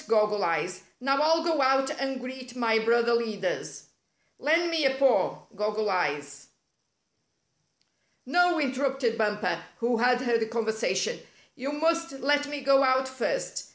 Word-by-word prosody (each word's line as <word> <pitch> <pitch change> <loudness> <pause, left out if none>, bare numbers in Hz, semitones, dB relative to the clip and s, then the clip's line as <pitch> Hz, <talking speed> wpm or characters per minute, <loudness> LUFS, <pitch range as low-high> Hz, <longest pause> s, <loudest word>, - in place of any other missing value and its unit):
Goggle 210 -2 +2
Eyes. 170 +2 -1 0.2
Now 275 +2 +1
I'll 325 +1 +3
go 325 -4 +1
out 270 0 +3
and 270 -1 -2
greet 255 0 -9
my 225 -3 +2
brother 235 +1 +2
leaders. 215 -5 -3 0.5
Lend 335 +3 +2
me 325 -2 +1
a 265 -1 +2
paw. 265 -2 +2
Goggle 210 +1 -1
Eyes." 145 -5 -2 1.8
"No," 350 +5 +3
interrupted 265 -3 0
Bumper, 210 -1 -1 0.2
who 235 0 0
had 245 +1 +2
heard 240 -2 +1
the 220 - -1
conversation. 225 - -1 0.4
"You 270 +3 -4
must 330 +1 0
let 290 +2 +1
me 290 -1 -5
go 275 0 +4
out 260 0 +2
first. 260 - -3
255 Hz, 140 wpm, -27 LUFS, 220-280 Hz, 1.8 s, go